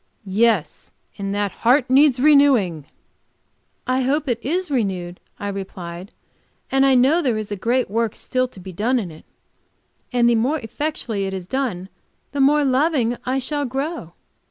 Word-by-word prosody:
"Yes; 200 -3 0 0.3
and 195 0 -3
that 205 -1 -1
heart 250 +3 +2
needs 265 0 +4
renewing." 260 - +4 1.0
"I 255 +1 +1
hope 285 +3 0
it 235 -2 -2
is 345 +4 -2
renewed," 185 -8 -2 0.2
I 205 - -4
replied. 185 -2 -7 0.6
"But 270 0 +3
I 270 -1 +4
know 270 +7 +4
there 250 -8 0
is 215 -1 -5
a - - -1
great 240 +6 0
work 225 +1 -1
still 255 0 -1
to 220 - -14
be 185 +1 -9
done 230 +8 +1
in 195 -8 -3
it. 155 - -15 0.9
And 240 -1 +3
the 240 - +4
more 250 +7 +1
effectually 235 -4 -3
it 190 - -4
is 185 -2 -6
done 205 -5 -3 0.4
the 285 - -1
more 290 +2 +4
loving 260 -3 +2
I 260 +1 +1
shall 290 +2 -2
grow. 270 - -4
245 Hz, 165 wpm, -21 LUFS, 200-275 Hz, 1.0 s, needs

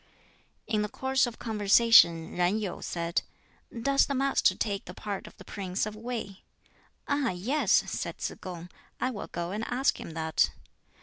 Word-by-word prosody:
In 215 -2 0
the 210 - -2
course 265 +3 +1
of 235 - -7
conversation 210 -6 +5
Yen 180 +4 +2
Yu 205 -5 -4
said, 170 0 -1 0.6
"Does 275 +1 +4
the 280 - -1
Master 275 +1 +3
take 200 -3 -2
the 180 - -9
part 205 -2 -5
of - - -15
the - - -13
Prince 190 -1 -2
of 215 0 -6
Wei?" 220 -4 -5 0.7
"Ah 285 -2 +1
yes!" 220 +12 -1
said - - +1
Tsz - - -2
kung, 175 -1 -7 0.3
"I 255 - 0
will 205 - -6
go 170 +1 -4
and 210 +3 -3
ask 260 +3 +1
him 160 - -8
that." 160 -1 +2
210 Hz, 170 wpm, -29 LUFS, 180-245 Hz, 0.7 s, conversation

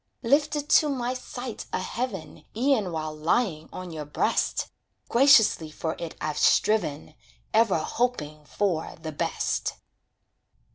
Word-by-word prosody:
Lifted 290 +3 +2
to 300 - +5
my 250 -3 -1
sight 250 -2 -7
a - - 0
heaven, 230 -8 -5
E'en 235 -7 +2
while 155 -1 -4
lying 160 +1 0
on 185 -1 -7
your 155 -2 -5
breast 145 0 0 0.4
Graciously 235 - +5
for 160 +1 -4
it 170 -2 -6
I've 150 -1 -2
striven, 160 -9 +2 0.4
Ever 220 -5 +4
hoping 155 -5 -2
for 175 -2 -1
the 160 -1 -5
best. 145 - -2
195 Hz, 125 wpm, -26 LUFS, 155-245 Hz, 0.4 s, to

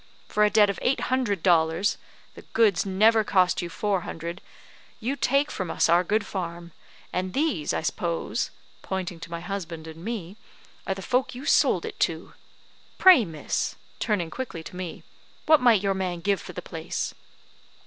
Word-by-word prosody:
For 210 - +2
a 210 - +5
debt 210 0 +5
of 200 - -3
eight 260 - +1
hundred 205 -9 0
dollars 165 +1 +3 0.3
the - - -12
goods 215 -4 +3
never 215 +4 +4
cost 185 -3 +2
you 175 - -4
four 200 +1 -1
hundred 170 +2 -6 0.6
you 250 +5 -2
take 275 +2 +1
from 185 -3 -4
us 165 - +2
our 170 +2 +5
good 210 +4 0
farm; 170 -2 -5 0.4
and 185 0 -2
these, 270 - 0
I - - -2
s'pose," 170 +1 -2 0.3
pointing 185 -3 -4
to 165 - -9
my 170 0 -5
husband 170 -3 -5
and 160 +1 -10
me, 205 -3 -5 0.5
"are 195 - 0
the 195 - -8
folk 255 0 0
you 260 +3 -8
sold - - +3
it - - -7
to. - - -1 0.6
Pray, 365 -10 +8
miss," 160 -4 -3 0.2
turning 180 -7 -1
quickly 240 -11 -5
to 180 - -10
me, 180 -2 -6 0.4
"what 310 -2 +6
might 230 -5 +5
your 195 -1 +2
man 180 -2 -3
give 200 +1 +1
for - - -9
the - - -6
place?" - - -4
190 Hz, 175 wpm, -26 LUFS, 170-220 Hz, 0.6 s, Pray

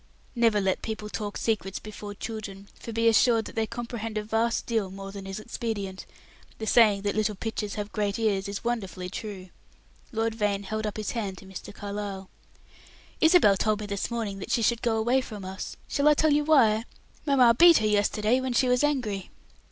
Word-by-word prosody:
Never 230 -4 +3
let 190 -1 0
people 215 -1 -5
talk 210 -1 -4
secrets 205 -4 -1
before 210 -1 -8
children, 200 -3 -7
for 230 - -9
be 230 +1 +1
assured 225 0 +4
that - - -8
they 225 -1 -1
comprehend 230 -2 -5
a 210 - -1
vast 225 +2 0
deal 220 -5 -1
more 195 +1 -8
than 195 -1 -8
is 195 +2 -5
expedient; 215 -4 -5 0.5
the 220 - -5
saying 210 -3 +5
"that 205 - 0
little 215 -1 0
pitchers 210 0 -4
have 210 -1 -4
great 205 -2 -1
ears" 200 -4 0
is 200 0 -5
wonderfully 195 -6 -3
true. 195 -3 -7 0.6
Lord 225 -1 0
Vane 205 -2 -1
held 215 +2 -3
up 210 - -5
his 215 -2 -3
hand 205 -5 -3
to 195 - -12
Mr. 190 -1 -9
Carlyle, 200 -2 -6 0.9
"Isabel 320 - +6
told 215 +1 +1
me 210 - -5
this 200 -1 -3
morning 220 -4 -3
that - - -7
she 230 - +1
should 235 +1 +2
go 230 -2 +1
away 240 +4 +2
from 210 -6 -8
us. 190 0 -6
Shall 285 +1 +1
I 300 - +7
tell 310 +1 +3
you 295 0 +2
why? 230 -8 +4 0.4
Mamma 255 -4 +6
beat 335 +7 +7
her 220 - 0
yesterday 210 +3 +2
when 260 -1 -2
she 255 +2 +3
was 250 +2 +2
angry." 235 -10 -1
215 Hz, 200 wpm, -27 LUFS, 200-235 Hz, 0.9 s, I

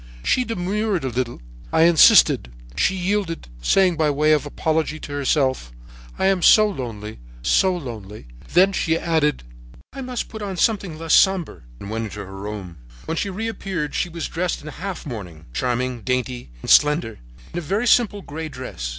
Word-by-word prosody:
"She 255 - +2
demurred 205 - -1
a 130 - -1
little. 120 - -3 0.3
I 160 - +4
insisted. 165 - +6 0.2
She 190 - +2
yielded, 185 - -2
saying 180 - +3
by 155 -1 +2
way 150 +2 +2
of 150 -1 +1
apology 155 +1 -1
to 145 - -9
herself: 135 - 0 0.5
'I - - 0
am 190 -1 +2
so 215 +4 +7
lonely—so 110 - -2
lonely.' 110 - -8 0.3
Then 190 +3 +5
she 165 -3 +1
added: 160 - 0 0.5
"'I 270 - -6
must 250 -2 -4
put 220 - -8
on 195 -3 -4
something 195 -6 0
less 165 0 -1
sombre, 190 -4 +3 0.2
and 100 - -8
went 115 0 -2
into 105 -1 -7
her - - -7
bedroom. 95 -3 -7 0.3
When - - -3
she 200 - -1
reappeared 195 -6 -4
she 180 - -1
was 170 -1 -4
dressed 175 -1 -3
in 155 - -7
half 185 +4 -6
mourning, 90 - -8
charming, 125 - -1
dainty 125 - -2
and - - -1
slender 150 -6 +4 0.3
in - - -2
a - - -5
very 200 +8 -1
simple 215 -5 +3
gray 160 +2 -6
dress. 125 - -6
155 Hz, 170 wpm, -22 LUFS, 120-190 Hz, 0.5 s, so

